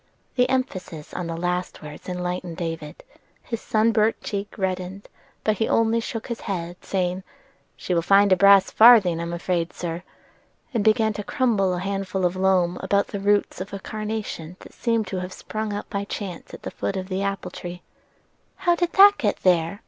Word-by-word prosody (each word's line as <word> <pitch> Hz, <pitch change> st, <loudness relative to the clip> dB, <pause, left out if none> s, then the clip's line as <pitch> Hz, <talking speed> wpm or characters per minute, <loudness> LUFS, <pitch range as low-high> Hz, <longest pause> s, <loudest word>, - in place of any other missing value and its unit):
The 250 Hz, -1 st, +2 dB
emphasis 185 Hz, -, -3 dB
on 175 Hz, -, -4 dB
the 165 Hz, 0 st, -4 dB
last 180 Hz, 0 st, -2 dB
words 150 Hz, +4 st, -9 dB
enlightened 180 Hz, -1 st, -4 dB
David: 165 Hz, -3 st, -5 dB, 0.4 s
his 230 Hz, -3 st, -5 dB
sunburnt 220 Hz, 0 st, +2 dB
cheek 200 Hz, +1 st, -4 dB
reddened, 190 Hz, 0 st, -3 dB, 0.4 s
but 215 Hz, -1 st, +1 dB
he 225 Hz, -, +2 dB
only 230 Hz, 0 st, +3 dB
shook 225 Hz, 0 st, -5 dB
his 235 Hz, -1 st, -5 dB
head, 175 Hz, -3 st, -5 dB
saying: 185 Hz, -1 st, -1 dB, 0.6 s
"She 180 Hz, -, -3 dB
will 170 Hz, -, +2 dB
find 200 Hz, +3 st, +5 dB
a -, -, +8 dB
brass 200 Hz, 0 st, +6 dB
farthing 215 Hz, -8 st, +7 dB
I'm 170 Hz, 0 st, -3 dB
afraid, 170 Hz, 0 st, -2 dB
sir," 170 Hz, -1 st, -4 dB, 0.7 s
and 225 Hz, -4 st, +1 dB
began 220 Hz, 0 st, +3 dB
to 210 Hz, -, -5 dB
crumble 200 Hz, -7 st, +1 dB
a -, -, -3 dB
handful 195 Hz, 0 st, -2 dB
of 180 Hz, +1 st, 0 dB
loam 185 Hz, -2 st, +2 dB
about 200 Hz, 0 st, +1 dB
the 200 Hz, -, -4 dB
roots 205 Hz, -2 st, +1 dB
of 195 Hz, +1 st, -7 dB
a 200 Hz, -, -4 dB
carnation 215 Hz, -6 st, -5 dB
that -, -, -13 dB
seemed 230 Hz, -2 st, 0 dB
to 190 Hz, -, -3 dB
have 180 Hz, +1 st, -6 dB
sprung 215 Hz, 0 st, -4 dB
up 205 Hz, 0 st, -4 dB
by 200 Hz, -1 st, -2 dB
chance 195 Hz, -4 st, -6 dB
at -, -, -11 dB
the -, -, -5 dB
foot 195 Hz, -, -3 dB
of 185 Hz, 0 st, -4 dB
the 190 Hz, 0 st, -2 dB
apple 200 Hz, 0 st, -3 dB
tree. 175 Hz, 0 st, -8 dB, 0.7 s
"How 355 Hz, -2 st, +2 dB
did 345 Hz, 0 st, -1 dB
that 405 Hz, +1 st, +7 dB
get 210 Hz, -, -1 dB
there?" 175 Hz, +1 st, +2 dB
195 Hz, 185 wpm, -24 LUFS, 180-215 Hz, 0.7 s, a